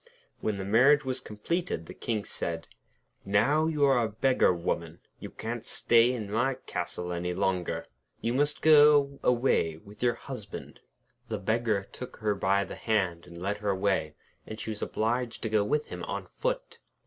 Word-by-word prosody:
When 105 -2 -1
the 95 - -4
marriage 135 +8 +5
was 130 0 -2
completed, 130 - -3
the - - -9
King 110 -3 -3
said: 80 -1 -3 0.6
'Now 135 +11 +3
you 150 -3 +2
are 130 -4 +4
a 110 - -1
beggar 125 0 +3
woman, 85 -1 -3 0.2
you - - -7
can't 115 +1 -5
stay 115 +1 +4
in 110 -5 -4
my 120 +5 +1
castle 90 -7 -4
any 90 +1 -2
longer. 90 -2 -1 0.3
You 115 - -1
must 145 +3 +1
go 145 -2 +6
away 120 -10 +2
with 100 +5 -15
your 120 -1 +2
Husband.' 125 -4 -8 0.5
The 110 - -1
Beggar 110 -1 0
took 125 - -8
her 105 -2 0
by 100 0 +2
the - - -8
hand 95 -7 -1
and 85 -1 -10
led 100 +3 -2
her 105 -1 -2
away, 95 -6 0 0.3
and 110 - -7
she 110 0 -4
was 105 - -5
obliged 120 +2 -1
to 110 - -1
go 105 -1 +3
with 150 +9 -1
him - - -6
on - - -4
foot. - - -3
110 Hz, 175 wpm, -29 LUFS, 95-130 Hz, 0.6 s, go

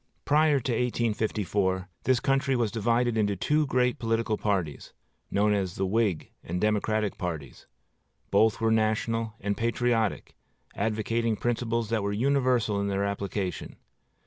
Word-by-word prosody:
Prior 150 -1 +4
to 130 0 -2
1854, 105 -5 0 0.2
this 130 -1 +3
country 135 +1 +1
was 115 -4 0
divided 120 +1 +1
into 100 -2 +1
two 150 - +1
great 125 -2 +1
political 115 -1 0
parties, 95 -9 -2 0.4
known 105 +1 +2
as 95 -3 -1
the 95 - -1
Whig 100 -4 0
and 90 +2 -3
Democratic 105 0 0
parties. 80 -8 -5 0.6
Both 110 -2 +3
were 115 -1 +2
national 110 0 0
and 100 +1 -1
patriotic, 115 -2 0 0.4
advocating 110 +2 0
principles 115 0 -1
that 115 -2 +1
were 100 0 -1
universal 125 -3 +1
in 100 - -1
their 100 0 0
application. 100 -2 -3
110 Hz, 135 wpm, -27 LUFS, 100-120 Hz, 0.6 s, Prior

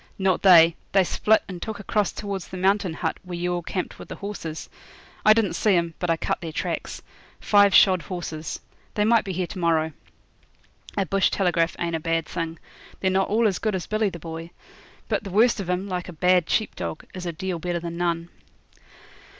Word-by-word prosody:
'Not 190 -2 +1
they. 170 -3 +7 0.2
They 195 -1 +5
split 220 +4 +2
and 180 -2 -7
took 220 -2 -5
across 205 -1 0
towards 200 -3 -5
the 185 - -7
Mountain 190 -2 +1
Hut, 160 -1 -2
where 180 -1 -7
you 175 +1 -1
all 175 - -2
camped 180 +2 -4
with - - -9
the - - -6
horses. 185 -6 -6 0.6
I 215 - +7
didn't 215 -6 +1
see 195 +3 +2
'em; 170 -1 0
but 175 - -2
I 165 - +2
cut - - -2
their 165 -2 -5
tracks. - - -4 0.4
Five 205 -2 +5
shod 185 -3 +6
horses. 160 -2 -5 0.3
They 210 - +2
might 230 0 +4
be 195 - -4
here 180 0 -1
to 185 - -8
morrow.' 160 -2 +2 1.1
A 195 - +2
bush 195 +1 +2
telegraph 175 -3 +1
ain't 170 -1 -2
a - - -1
bad 165 0 0
thing. 165 -1 -4 0.4
They're 190 - +1
not 190 0 +1
all 225 +2 +3
as 195 - -1
good 215 -3 -1
as 185 - -3
Billy 215 -1 0
the 175 - -8
Boy. 165 0 -7 0.6
But - - -1
the 200 - -6
worst 220 +5 +3
of 190 -3 -4
'em, 180 +2 -1
like 180 -2 -4
a - - -7
bad 180 +1 +3
sheep 220 - 0
dog, 85 -2 -5
is 180 -1 -6
a - - -1
deal 180 +1 -4
better 175 +1 -2
than 170 0 -6
none. 170 -1 -1
180 Hz, 210 wpm, -24 LUFS, 170-195 Hz, 1.1 s, they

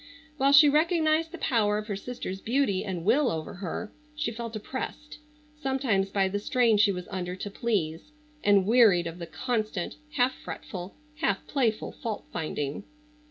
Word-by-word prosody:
While 275 0 +4
she 285 +2 +9
recognized 315 +1 +2
the 350 - -7
power 210 -8 +2
of 210 - -4
her 210 -2 -3
sister's 195 -3 -6
beauty 230 -6 +1
and 180 -5 -4
will 255 +5 +4
over 160 -6 -4
her, 190 +3 -5 0.2
she 300 -6 -1
felt 230 0 -6
oppressed 265 +7 -6 0.4
sometimes 255 -8 +1
by 195 -1 +2
the 200 +2 -2
strain 230 0 +3
she 205 0 +5
was 180 -2 -5
under 180 -1 -3
to 200 +2 -6
please, 200 - -2 0.3
and 200 -2 +5
wearied 215 -6 +5
of 170 +1 -6
the 170 - -6
constant, 215 -2 -2 0.2
half 255 -1 +2
fretful, 180 -1 -8 0.2
half 320 - 0
playful 230 -6 0
fault 220 -3 -5
finding. 150 -1 -3
215 Hz, 160 wpm, -28 LUFS, 190-260 Hz, 0.4 s, she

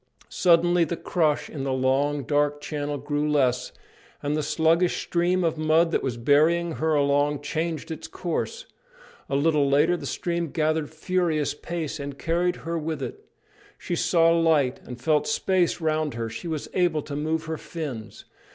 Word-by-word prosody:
Suddenly 175 0 +4
the 165 +2 -4
crush 155 -5 0
in 140 -4 -6
the 135 - -1
long, 135 +2 +1
dark 145 +3 +1
channel 145 -1 -3
grew 145 +2 -1
less, 130 -4 +1 0.5
and 145 +1 0
the 155 - 0
sluggish 165 +4 +2
stream 180 +1 +1
of 165 -2 0
mud 160 +2 +3
that - - +1
was 125 -3 -3
bearing 155 +7 +3
her 160 0 +1
along 145 0 +2
changed 160 +2 -3
its 160 - -6
course. 185 - -4 0.6
A 135 - 0
little 145 -1 +2
later 150 +5 +4
the 150 -5 -6
stream 170 +2 -2
gathered 155 0 0
furious 160 -2 0
pace 160 0 -5
and 140 -1 -6
carried 175 +3 0
her 165 0 -1
with 155 -2 -3
it; - - -7 0.5
she 175 - -3
saw 165 -1 +3
light 160 -6 +2
and 125 -1 -8
felt 150 +3 +1
space 185 -5 +1
round 155 -4 0
her; 115 -1 -3
she 115 +10 -6
was 155 -3 -3
able 175 -5 +1
to 145 - -6
move 155 +2 -1
her 160 0 -3
fins. 140 -10 -7
155 Hz, 170 wpm, -25 LUFS, 145-170 Hz, 0.6 s, Suddenly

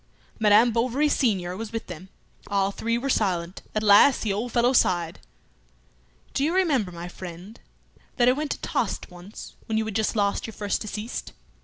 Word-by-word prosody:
Madame 220 +2 +5
Bovary 250 +6 +1
senior 190 -11 0
was 220 +2 -6
with 225 0 -4
them. 180 +1 -10 0.4
All 200 -1 +1
three 230 +3 -1
were 255 +3 -3
silent. 185 -7 -1
At 215 - 0
last 210 +6 +6
the 210 -3 0
old 230 +4 -3
fellow 245 +2 +3
sighed 175 -8 +1 1.1
"Do 275 - 0
you 325 +5 +1
remember, 280 - +1
my 170 0 -7
friend, 180 +4 -10 0.6
that 240 -1 +3
I - - +7
went 295 +3 -2
to - - -3
Tostes - - -2
once 180 +4 -11
when 220 - -1
you 220 - 0
had 215 -2 -5
just 220 +1 0
lost 200 0 0
your 225 - -9
first 205 -1 -2
deceased? 215 +2 -5
215 Hz, 180 wpm, -25 LUFS, 190-240 Hz, 1.1 s, I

